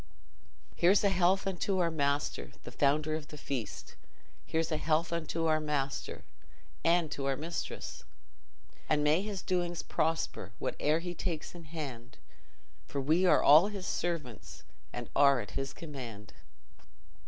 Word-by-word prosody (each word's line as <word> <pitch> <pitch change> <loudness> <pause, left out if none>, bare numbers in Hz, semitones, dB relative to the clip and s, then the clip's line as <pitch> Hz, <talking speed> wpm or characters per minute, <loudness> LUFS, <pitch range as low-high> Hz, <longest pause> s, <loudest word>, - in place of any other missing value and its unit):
"Here's 190 +5 +4
a 200 - +5
health 190 +1 +3
unto 195 0 0
our 170 -2 +2
master, 140 - -1
The - - -8
founder 150 +2 +2
of 155 -1 -3
the 150 - -10
feast; 135 -6 -5 0.5
Here's 160 0 0
a 155 - +1
health 160 +2 +1
unto 165 0 -1
our 155 -1 +3
master 145 -3 -2 0.6
And 170 -2 +3
to 135 -1 -2
our 135 - +1
mistress! 165 +3 -5 0.9
And 150 -1 +3
may 150 +4 +4
his 200 -2 -4
doings 175 -2 -1
prosper, 160 - -1
Whate'er 155 +2 0
he 175 0 -4
takes 170 -3 -4
in 170 -2 -10
hand, 140 -7 -7 0.7
For 140 - -3
we 160 +7 +3
are - - +5
all 155 +7 +8
his 200 -3 -5
servants, 155 -10 -3 0.3
And - - -5
are 140 -2 +6
at 105 -4 -6
his 135 0 -3
command." 125 -10 -8
155 Hz, 145 wpm, -32 LUFS, 140-175 Hz, 0.9 s, all